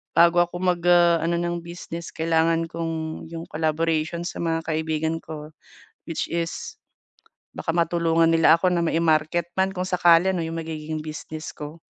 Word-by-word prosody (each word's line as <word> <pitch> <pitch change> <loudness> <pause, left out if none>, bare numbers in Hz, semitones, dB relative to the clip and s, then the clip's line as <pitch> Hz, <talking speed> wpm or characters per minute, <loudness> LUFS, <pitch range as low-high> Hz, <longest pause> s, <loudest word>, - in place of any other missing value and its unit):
bago 170 +1 +6
ako 175 0 -8
mag, 180 -2 +1
ah, 175 -1 +5
ano 170 +1 +1
ng 175 0 -2
business, 170 -1 -7
kailangan 165 0 +1
kong 165 -1 -4
yung 165 0 -7
collaboration 160 +1 -1
sa 175 - -5
mga 165 -1 -1
kaibigan 160 0 -1
ko, 155 -1 -8 0.6
which 165 - -2
is, 170 0 -3 0.8
baka 165 - -2
matulungan 165 -1 +2
nila 165 0 +5
ako 185 - +3
na 175 -2 +1
mai-market 165 0 +1
man 190 0 +1
kung 185 -1 -3
sakali 175 0 +5
'no, 180 -3 -1
yung 165 0 -4
magiging 155 -1 -5
business 155 0 -7
ko. 150 +2 -8
165 Hz, 155 wpm, -24 LUFS, 160-170 Hz, 0.8 s, bago